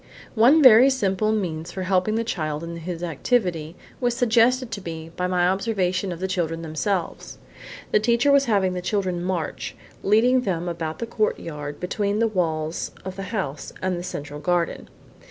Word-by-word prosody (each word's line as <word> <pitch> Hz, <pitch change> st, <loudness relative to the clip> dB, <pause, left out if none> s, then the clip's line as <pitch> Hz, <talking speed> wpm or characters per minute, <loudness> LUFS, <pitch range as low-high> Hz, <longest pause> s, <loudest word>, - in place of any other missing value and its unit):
One 255 Hz, +8 st, +5 dB
very 255 Hz, +1 st, +9 dB
simple 215 Hz, -5 st, +1 dB
means 175 Hz, -6 st, -2 dB
for 190 Hz, +1 st, -4 dB
helping 185 Hz, +3 st, +1 dB
the 230 Hz, -, 0 dB
child 155 Hz, -8 st, -3 dB
in 170 Hz, 0 st, -6 dB
his 170 Hz, +1 st, -5 dB
activity 170 Hz, -, -1 dB, 0.2 s
was 245 Hz, -1 st, 0 dB
suggested 245 Hz, 0 st, +3 dB
to 200 Hz, -, -4 dB
me 165 Hz, -2 st, -7 dB
by 180 Hz, -, -1 dB
my 180 Hz, -1 st, +2 dB
observation 190 Hz, -1 st, 0 dB
of 170 Hz, -, -6 dB
the 190 Hz, -, -1 dB
children 165 Hz, -3 st, -2 dB
themselves. 165 Hz, +3 st, -3 dB, 0.5 s
The -, -, +4 dB
teacher 235 Hz, +5 st, +3 dB
was 280 Hz, 0 st, +5 dB
having 200 Hz, -6 st, +2 dB
the 180 Hz, -, -3 dB
children 185 Hz, -2 st, -1 dB
march, 180 Hz, -4 st, -3 dB, 0.3 s
leading 240 Hz, +5 st, +4 dB
them 180 Hz, -6 st, -2 dB
about 160 Hz, -2 st, -4 dB
the -, -, -3 dB
courtyard 160 Hz, -10 st, -3 dB
between 200 Hz, +3 st, -1 dB
the 230 Hz, +1 st, +3 dB
walls 160 Hz, -5 st, -1 dB, 0.2 s
of 190 Hz, -1 st, -5 dB
the 195 Hz, -, -6 dB
house 185 Hz, -11 st, -4 dB
and 185 Hz, -1 st, -1 dB
the -, -, -6 dB
central 145 Hz, -4 st, -6 dB
garden. 170 Hz, +2 st, -1 dB
185 Hz, 170 wpm, -24 LUFS, 170-220 Hz, 0.5 s, very